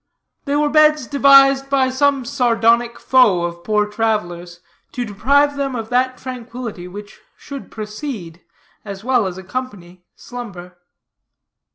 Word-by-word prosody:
They 280 Hz, 0 st, -1 dB
were 295 Hz, 0 st, +1 dB
beds 305 Hz, -2 st, +4 dB
devised 275 Hz, 0 st, +5 dB
by 265 Hz, -2 st, +2 dB
some 275 Hz, -1 st, +1 dB
sardonic 235 Hz, -2 st, +1 dB
foe 215 Hz, -10 st, +3 dB
of 170 Hz, 0 st, -5 dB
poor 210 Hz, -1 st, +1 dB
travelers, 180 Hz, -5 st, -3 dB, 0.3 s
to 245 Hz, -1 st, -3 dB
deprive 280 Hz, +8 st, +2 dB
them 275 Hz, -2 st, -2 dB
of 225 Hz, -2 st, -5 dB
that 255 Hz, +1 st, 0 dB
tranquility 240 Hz, -6 st, -7 dB
which 205 Hz, +3 st, -11 dB, 0.2 s
should 280 Hz, -2 st, -9 dB
precede, 210 Hz, -, -7 dB, 0.4 s
as 200 Hz, -1 st, -8 dB
well 245 Hz, -4 st, +1 dB
as 185 Hz, -1 st, -6 dB
accompany, 185 Hz, -4 st, -7 dB
slumber. 190 Hz, -8 st, -10 dB
240 Hz, 130 wpm, -19 LUFS, 200-270 Hz, 0.4 s, devised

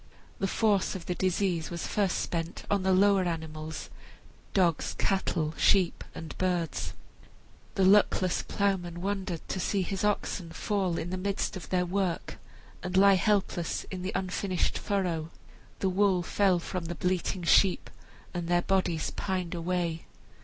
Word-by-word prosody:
The 195 Hz, -, +1 dB
force 205 Hz, -2 st, +2 dB
of 175 Hz, -3 st, -6 dB
the 180 Hz, -, -1 dB
disease 180 Hz, -2 st, 0 dB
was 170 Hz, -1 st, -4 dB
first 200 Hz, -3 st, 0 dB
spent 165 Hz, 0 st, -3 dB
on 200 Hz, -1 st, +3 dB
the 190 Hz, 0 st, +2 dB
lower 195 Hz, 0 st, +4 dB
animals 160 Hz, -2 st, -5 dB, 0.6 s
dogs, 170 Hz, -5 st, +1 dB
cattle, 170 Hz, -5 st, 0 dB
sheep, 190 Hz, -4 st, +3 dB
and 160 Hz, -, -7 dB
birds 175 Hz, -4 st, -1 dB, 0.8 s
The 190 Hz, -, +3 dB
luckless 190 Hz, -2 st, +4 dB
ploughman 180 Hz, -4 st, -1 dB
wondered 190 Hz, -4 st, -3 dB
to 190 Hz, -, -3 dB
see 195 Hz, +2 st, 0 dB
his 195 Hz, +2 st, -3 dB
oxen 195 Hz, -4 st, -1 dB
fall 190 Hz, -3 st, -1 dB
in 175 Hz, -, -3 dB
the 185 Hz, -, -2 dB
midst 200 Hz, +2 st, -2 dB
of 185 Hz, -, -8 dB
their 180 Hz, -1 st, +1 dB
work, 185 Hz, -1 st, -2 dB, 0.4 s
and 180 Hz, +1 st, -2 dB
lie 200 Hz, +1 st, +7 dB
helpless 190 Hz, -3 st, +1 dB
in 185 Hz, -2 st, -4 dB
the 185 Hz, +2 st, -2 dB
unfinished 185 Hz, 0 st, -1 dB
furrow. 180 Hz, -6 st, -1 dB, 0.5 s
The 190 Hz, -, +2 dB
wool 185 Hz, -1 st, +2 dB
fell 195 Hz, 0 st, +2 dB
from 175 Hz, 0 st, -4 dB
the 175 Hz, +1 st, -4 dB
bleating 180 Hz, +2 st, -1 dB
sheep, 185 Hz, +2 st, +4 dB, 0.5 s
and 175 Hz, -2 st, -3 dB
their 175 Hz, 0 st, +2 dB
bodies 185 Hz, -4 st, 0 dB
pined 185 Hz, -3 st, -2 dB
away. 170 Hz, -1 st, -2 dB
185 Hz, 150 wpm, -29 LUFS, 170-195 Hz, 0.8 s, lie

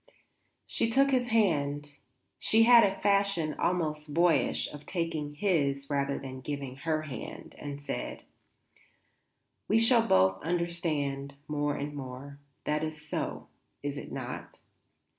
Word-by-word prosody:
She 225 Hz, -, +1 dB
took 275 Hz, +4 st, +4 dB
his 250 Hz, -2 st, +2 dB
hand, 145 Hz, -10 st, +1 dB, 0.5 s
she 225 Hz, +1 st, +5 dB
had 235 Hz, 0 st, +8 dB
a 195 Hz, -1 st, +1 dB
fashion 200 Hz, -6 st, +2 dB
almost 155 Hz, -4 st, -1 dB
boyish 170 Hz, 0 st, +3 dB
of 150 Hz, 0 st, -10 dB
taking 160 Hz, -4 st, -2 dB
his 140 Hz, -6 st, 0 dB
rather 140 Hz, 0 st, 0 dB
than 130 Hz, -1 st, -7 dB
giving 140 Hz, -2 st, -5 dB
her 155 Hz, +1 st, -1 dB
hand, 135 Hz, -7 st, -7 dB
and 145 Hz, -1 st, -6 dB
said: -, -, -4 dB, 1.4 s
"We 220 Hz, -, +4 dB
shall 230 Hz, 0 st, +5 dB
both 95 Hz, 0 st, +4 dB
understand 155 Hz, -5 st, -1 dB
more 145 Hz, -1 st, 0 dB
and 145 Hz, +1 st, -4 dB
more; 140 Hz, +1 st, -8 dB, 0.2 s
that 150 Hz, +1 st, 0 dB
is 155 Hz, -1 st, -4 dB
so, 150 Hz, 0 st, -4 dB, 0.3 s
is 145 Hz, 0 st, -2 dB
it -, -, -7 dB
not? -, -, -6 dB
150 Hz, 130 wpm, -30 LUFS, 140-180 Hz, 1.4 s, had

